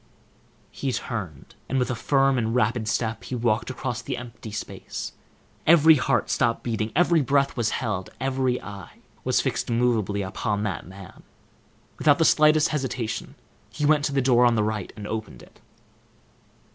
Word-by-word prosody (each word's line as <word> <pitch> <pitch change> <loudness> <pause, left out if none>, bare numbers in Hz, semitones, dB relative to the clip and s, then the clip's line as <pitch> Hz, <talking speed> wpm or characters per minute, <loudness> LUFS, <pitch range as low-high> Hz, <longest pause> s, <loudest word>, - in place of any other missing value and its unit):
He 135 - -3
turned, 95 - -5 0.2
and 135 - 0
with 125 -1 +1
a - - -1
firm 135 +1 +2
and 115 0 -1
rapid 115 -2 +1
step 115 +1 -2
he 130 - -4
walked 115 -1 0
across 130 -2 -4
the 120 - -4
empty 120 -2 -9
space. 105 - -6 0.5
Every 160 0 +8
heart 135 - +1
stopped 115 -1 +1
beating, 110 -2 -2
every 170 0 +4
breath 140 0 +1
was 115 -2 0
held, 105 -6 -3
every 130 -1 0
eye 100 -3 -10 0.3
was - - +2
fixed - - -2
immovably 115 -4 +1
upon 105 +2 -2
that 95 -6 -3
man. 95 0 -12 0.8
Without 145 -2 +4
the 165 - +3
slightest 155 +1 +5
hesitation, 130 -6 -3 0.3
he 150 +7 -3
went 150 -1 +4
to - - -1
the 135 -2 +1
door 125 -2 +4
on 120 -1 +4
the 110 - +2
right, 105 -2 -3
and 105 - -8
opened 110 +1 -5
it. - - -19
120 Hz, 165 wpm, -25 LUFS, 110-135 Hz, 0.8 s, Every